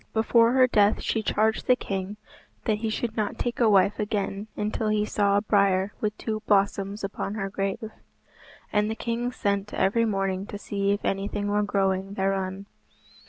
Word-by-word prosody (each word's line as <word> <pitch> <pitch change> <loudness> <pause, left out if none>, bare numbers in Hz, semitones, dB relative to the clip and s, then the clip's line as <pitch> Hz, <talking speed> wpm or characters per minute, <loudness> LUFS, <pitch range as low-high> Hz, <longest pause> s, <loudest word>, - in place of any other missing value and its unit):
Before 230 +1 +4
her 260 -1 +6
death 210 -4 +3
she 225 - 0
charged 220 +1 0
the 250 - +6
king 195 -2 -4 0.5
that 215 -2 +1
he 225 0 -1
should 220 +1 -3
not 215 -2 -2
take 240 -1 -3
a 230 -3 +5
wife 200 0 +4
again 205 -1 -2
until 215 +1 -1
he 215 0 +1
saw 200 -1 +2
a 205 - 0
briar 200 -1 +2
with 215 -1 -1
two 215 -1 -3
blossoms 200 0 +1
upon 195 +1 -4
her 195 -2 -3
grave, 200 +3 -3 0.8
and 210 0 +2
the 220 - -2
king 235 +2 -2
sent 200 -3 -2
every 210 +5 +2
morning 195 -2 -1
to 205 - -6
see 200 -1 -1
if 205 - -2
anything 200 +1 -1
were 205 0 +2
growing 195 -1 0
thereon. 195 0 -1
205 Hz, 175 wpm, -26 LUFS, 195-220 Hz, 0.8 s, her